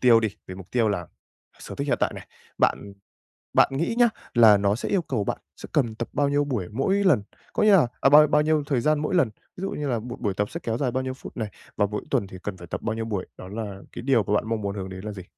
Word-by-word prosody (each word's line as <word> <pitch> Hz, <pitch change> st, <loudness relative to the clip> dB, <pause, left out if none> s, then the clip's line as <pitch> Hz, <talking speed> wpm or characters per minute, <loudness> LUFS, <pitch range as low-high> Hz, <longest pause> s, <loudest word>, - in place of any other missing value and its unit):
tiêu 120 Hz, -3 st, +6 dB
đi, 110 Hz, -, +1 dB, 0.2 s
về 95 Hz, -, -7 dB
mục 95 Hz, -1 st, -11 dB
tiêu 115 Hz, -3 st, +2 dB
là 90 Hz, -5 st, -2 dB, 0.5 s
sở -, -, -8 dB
thích -, -, -3 dB
hiện -, -, +3 dB
tại -, -, +1 dB
này, -, -, -9 dB, 0.3 s
bạn 100 Hz, -, +1 dB, 0.6 s
bạn -, -, +6 dB
nghĩ 165 Hz, +11 st, -1 dB
nhá, 240 Hz, -1 st, +6 dB, 0.2 s
là 110 Hz, -4 st, +7 dB
nó 100 Hz, 0 st, +2 dB
sẽ 115 Hz, -, -4 dB
yêu 195 Hz, -, +2 dB
cầu 130 Hz, -9 st, -2 dB
bạn -, -, -2 dB, 0.2 s
sẽ -, -, -10 dB
cần 120 Hz, -7 st, +1 dB
tập 115 Hz, +1 st, -4 dB
bao 145 Hz, -1 st, +2 dB
nhiêu 145 Hz, +1 st, +2 dB
buổi 120 Hz, -11 st, -2 dB
mỗi 190 Hz, -, +1 dB
lần, 180 Hz, -, +4 dB, 0.3 s
có -, -, +1 dB
nghĩa 215 Hz, -, +6 dB
là 175 Hz, -11 st, +6 dB
ờ, -, -, +4 dB
bao 150 Hz, +2 st, +8 dB
bao 150 Hz, -, +3 dB
nhiêu 155 Hz, 0 st, +2 dB
thời 130 Hz, -5 st, +1 dB
gian 155 Hz, +1 st, +2 dB
mỗi 150 Hz, +4 st, -1 dB
lần? 160 Hz, -10 st, +4 dB, 0.3 s
Ví -, -, -8 dB
dụ 195 Hz, -, -2 dB
như 145 Hz, -1 st, -3 dB
là 120 Hz, -3 st, 0 dB
một 120 Hz, +2 st, -7 dB
buổi 105 Hz, -5 st, 0 dB
tập 105 Hz, +2 st, -1 dB
sẽ 170 Hz, -, -5 dB
kéo 115 Hz, -1 st, -1 dB
dài 125 Hz, -1 st, 0 dB
bao 130 Hz, +1 st, -1 dB
nhiêu 130 Hz, 0 st, -3 dB
phút 130 Hz, -, -11 dB
này, 110 Hz, -3 st, -2 dB, 0.3 s
và 105 Hz, -, +3 dB
mỗi 105 Hz, +1 st, -3 dB
tuần 100 Hz, -, +1 dB
thì 95 Hz, -, -10 dB
cần 100 Hz, -2 st, -4 dB
phải 85 Hz, -, -11 dB
tập -, -, -5 dB
bao 110 Hz, -, -1 dB
nhiêu 115 Hz, 0 st, -3 dB
buổi? 105 Hz, -4 st, -3 dB
Đó -, -, -9 dB
là 100 Hz, -1 st, -6 dB
cái -, -, -7 dB
điều 125 Hz, -3 st, +3 dB
mà 100 Hz, -, -1 dB
bạn 105 Hz, -, +2 dB
mong 115 Hz, -1 st, -1 dB
muốn 100 Hz, 0 st, -3 dB
hướng 95 Hz, -2 st, -5 dB
đến 95 Hz, 0 st, -8 dB
là 105 Hz, -, -4 dB
gì? 95 Hz, -3 st, -8 dB
115 Hz, 295 wpm, -25 LUFS, 100-145 Hz, 0.6 s, bao